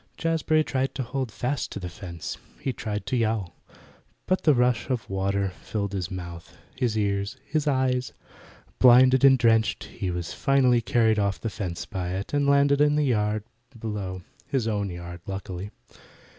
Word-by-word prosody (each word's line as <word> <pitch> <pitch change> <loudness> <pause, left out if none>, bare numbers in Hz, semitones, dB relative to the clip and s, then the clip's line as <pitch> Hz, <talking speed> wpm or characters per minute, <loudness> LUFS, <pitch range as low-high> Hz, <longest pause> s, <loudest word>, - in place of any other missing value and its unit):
Jazbury 160 -1 +2
tried 135 0 -1
to 130 - -2
hold 125 0 -3
fast 130 +5 -2
to - - -5
the 90 - -5
fence; 85 -1 -7 0.2
he 135 - -2
tried 105 -2 -4
to - - -1
yowl, 110 -7 0 0.7
but 185 - +1
the 150 -3 +6
rush 125 -1 +1
of 125 -3 -2
water 100 0 0
filled 100 -2 -3
his 95 -3 -2
mouth 85 -3 -8 0.2
his 120 -4 0
eyes 100 +3 -1
his 155 -1 -1
ears. 130 -1 0 0.7
Blinded 130 +1 +7
and 135 -1 +8
drenched, 115 -2 +2
he 95 - -5
was 90 0 -4
finally 130 -2 +3
carried 110 0 +2
off 100 -2 0
the 115 - -3
fence 90 -5 -4
by 90 -1 -4
it, 100 +7 -5
and 145 -1 +2
landed 140 0 +4
in 150 0 +4
the 150 0 +2
yard 105 -4 +1 0.4
below 100 -4 -4 0.2
his 130 -5 0
own 100 -2 -1
yard, 85 -1 -8
luckily. 95 0 -5
110 Hz, 170 wpm, -26 LUFS, 95-130 Hz, 0.7 s, and